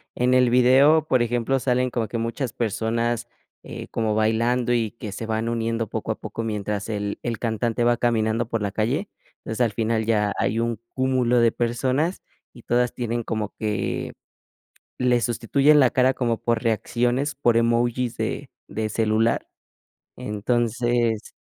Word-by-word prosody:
en 125 +1 +2
el 125 -1 +4
video, 135 +6 +5
por 130 -4 +3
ejemplo, 120 +3 0
salen 125 0 +1
como 115 -2 -1
que 115 - -4
muchas 115 +2 -3
personas, 115 +1 -1 0.4
eh, - - -8
como 110 -2 0
bailando 115 +3 +1
y 115 -3 0
que 110 -3 -8
se 105 +3 -5
van 110 +1 -1
uniendo 115 -1 -1
poco - - -3
a - - -5
poco 115 - -5
mientras 105 -2 -3
el 105 -1 -3
el 115 -2 -3
cantante 115 +1 -1
va 120 0 +3
caminando 115 -1 +1
por 115 -2 -1
la 100 -1 -1
calle. 120 - -1 0.4
O 110 - -4
sea, 120 - +2
al 110 - -8
final 110 0 0
ya 105 -2 +1
hay 110 +3 0
un 115 -2 -1 0.2
cúmulo 130 -2 +2
de 115 -1 +4
personas 130 +9 -1 0.3
y 120 - -15
todas 120 0 +1
tienen 120 -1 -2
como 110 -2 -3
que, 105 -2 -2 0.9
le 125 -1 +2
sustituyen 135 +6 +3
la 130 -3 +5
cara 130 +1 +3
como 120 -3 -1
por 115 -1 0
reacciones, 120 +5 0
por 120 -4 +2
emojis 120 +1 +1
de - - -3 0.2
de 110 0 -3
celular. 110 +1 +1 0.7
Entonces 120 +1 0
115 Hz, 160 wpm, -23 LUFS, 110-125 Hz, 0.9 s, video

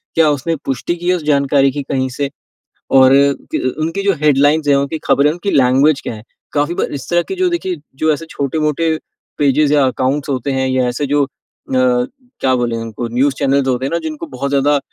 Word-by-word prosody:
क्या 160 -2 +4
उसने 145 +4 -1
पुष्टि 135 +6 -2
की 175 +1 -3
है 180 - +4
उस 165 - -5
जानकारी 140 -2 +3
की 145 +2 -4
कहीं 130 -1 0
से? 140 -1 -1 0.6
और 130 0 +6 0.4
त - - +1
अ, 130 +4 -3
उनकी 165 +5 -2
जो 200 - +3
हेडलाइंस 145 +1 +3
है, 140 - +5
उनकी 140 +3 -1
खबरें, 145 +2 +3
उनकी 175 +4 -3
लैंग्वेज 135 +3 +3
क्या 115 - -5
है? 105 - -11 0.3
काफ़ी 150 +3 0
बार - - -2
इस - - -11
तरह 175 0 +3
की 385 - -2
जो 370 -1 +1
देखिए 190 - -2 0.2
जो 155 +2 +1
ऐसे 165 +3 -6
छोटे-मोटे 155 +3 -1 0.4
पेजेज़ 145 +1 +2
या 145 -2 +4
अकाउंट्स 135 +3 -1
होते 135 +1 -1
हैं 130 - 0
या 130 -1 +1
ऐसे 120 +4 -2
जो 145 - +3
अ, - - -16 1.1
क्या 130 -1 +2
बोलें 120 -2 -1
उनको 115 +1 -5
न्यूज़ 135 +3 +2
चैनल्स 135 0 +1
होते 130 0 0
हैं 135 - -3
ना, - - +2
जिनको 155 -1 -5
बहुत 130 +2 -4
ज़्यादा 145 +1 +2
140 Hz, 215 wpm, -16 LUFS, 130-155 Hz, 1.1 s, और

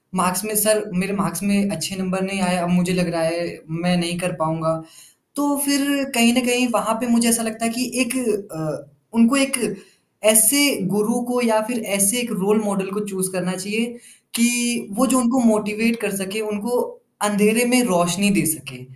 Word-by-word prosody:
Marks 185 +1 0
में 215 0 -4
sir 215 0 +3
मेरे 195 +2 -2
marks 180 -1 -3
में 200 0 +1
अच्छे 160 +3 -4
नंबर 190 0 -3
नहीं 195 0 -3
आए, 180 0 +1
अब 175 0 -2
मुझे 180 +1 +1
लग 180 -1 0
रहा 165 - -1
है, 170 +1 -2 0.2
मैं 175 +2 -1
नहीं 175 0 -2
कर 180 0 -2
पाऊँगा। 160 0 -2 0.6
तो 285 0 0
फिर 280 0 +1
कहीं 235 0 +5
न 255 - +3
कहीं 245 0 +2
वहाँ 210 +2 0
पे 250 - -3
मुझे 235 0 +3
ऐसा 230 0 +3
लगता 225 0 -5
है 230 - +1
कि 250 - -1 0.2
एक 250 -1 0 0.4
अ, 155 -2 -6 0.3
उनको 230 +4 +5
एक 270 -1 +2 0.8
ऐसे 220 +6 +7 0.3
गुरु 210 +4 0
को 245 0 0
या 220 -2 +2
फिर 245 -1 -3 0.2
ऐसे 200 +5 +4
एक 235 -1 -4
रोल 210 +2 +1
मॉडल 195 -1 -2
को 210 +1 -4
चूज़ 190 -1 -3
करना 185 0 -3
चाहिए, 210 +5 -3 0.5
कि 240 -1 +1
वो 265 - +4
जो 260 +1 +3
उनको 255 +1 +2
मोटिवेट 220 +1 +1
कर 205 -1 -2
सके, 195 +3 -4
उनको 215 +3 -3 0.4
अँधेरे 210 +3 +3
में 250 0 +5
रोशनी 180 +1 +1
दे - - -1
सके, 130 -4 -13
210 Hz, 195 wpm, -20 LUFS, 180-235 Hz, 0.8 s, ऐसे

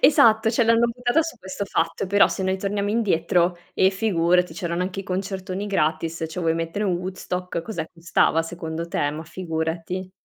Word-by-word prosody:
Esatto, 220 -6 +6
cioè 235 0 +2
l'hanno 230 +1 +4
buttata 245 +6 +1
su 320 -5 -6
questo 190 0 -5
fatto, 165 0 -1
però 200 +2 +5
se 190 - -3
noi 190 0 0
torniamo 200 +1 -1
indietro, 175 -5 +2 0.2
eh 190 - +5
figurati 180 -3 +2
c'erano 170 +1 -2
anche 185 +1 -3
i - - -7
concertoni 190 +1 -3
gratis. 165 -3 0
Cioè 170 - -5
vuoi 165 -1 +2
mettere 165 +5 -2
un 185 - +1
Woodstock, 180 -1 -4
cos'è, 205 -3 -4
costava 165 -1 +2
secondo 165 0 -5
te? 145 -3 0
Ma 155 +2 -6
figurati. 165 +2 -4
185 Hz, 175 wpm, -24 LUFS, 165-200 Hz, 0.2 s, Esatto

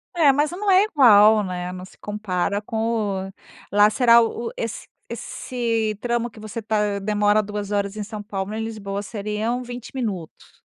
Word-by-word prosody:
É, 315 -5 +5
mas 295 +3 +1
não 400 +3 -2
é 380 +1 +6
igual, 220 - +6
né, 180 -1 -4
não 185 0 -8
se - - -18
compara 205 -1 -2
com 215 -4 -2 0.4
lá 205 +1 +6
será 235 +1 +6
o 230 +1 -2
esse 230 -1 -5 0.2
esse 230 -2 -2
trampo 240 0 -1
que 220 - -15
você 215 +2 -6
tá 210 -2 0
demora 210 +1 +2
2 205 0 -5
horas 200 0 -1
em 210 - -3
São 210 0 -7
Paulo 200 0 -4
em 220 0 -3
Lisboa 200 -3 -4
seriam 215 +4 -3
20 245 -1 -8
minutos? 205 -11 -6
215 Hz, 170 wpm, -23 LUFS, 205-235 Hz, 0.4 s, é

